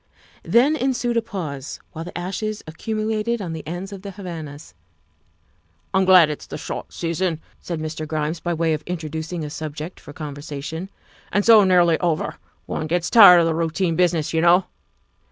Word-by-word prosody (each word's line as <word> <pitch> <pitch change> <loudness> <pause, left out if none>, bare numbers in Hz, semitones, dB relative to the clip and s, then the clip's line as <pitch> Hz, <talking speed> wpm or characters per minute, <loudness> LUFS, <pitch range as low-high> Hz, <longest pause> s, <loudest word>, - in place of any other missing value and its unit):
Then 265 +6 +3
ensued 250 -3 0
a 230 - +3
pause 155 -11 -6
while 160 - -6
the 175 - -8
ashes 205 +4 -4
accumulated 215 +6 -2
on 175 -5 -4
the 160 - -5
ends 180 +4 -5
of 195 - -8
the 200 - -7
Havanas. 165 - -8 1.2
"I'm 190 0 +3
glad 185 -3 +7
it's 150 - -7
the - - -6
short - - -6
session," 165 0 -2 0.2
said 170 -3 -5
Mr. 155 0 -5
Grimes 155 +1 -2
by 175 0 -2
way 165 0 +1
of 155 - -2
introducing 160 0 -4
a 150 - -7
subject 155 +2 -6
for - - -12
conversation, 150 +3 -6 0.2
" - - -28
and 205 - +1
so 225 -2 +8
nearly 175 -3 +4
over. 170 -3 -1 0.3
One 155 - -3
gets 175 +2 -1
tired 195 -7 +9
of - - +2
the 165 - +1
routine 165 +1 0
business, 170 -3 +1
you 160 - +2
know. 175 +2 +5
170 Hz, 175 wpm, -22 LUFS, 155-195 Hz, 1.2 s, tired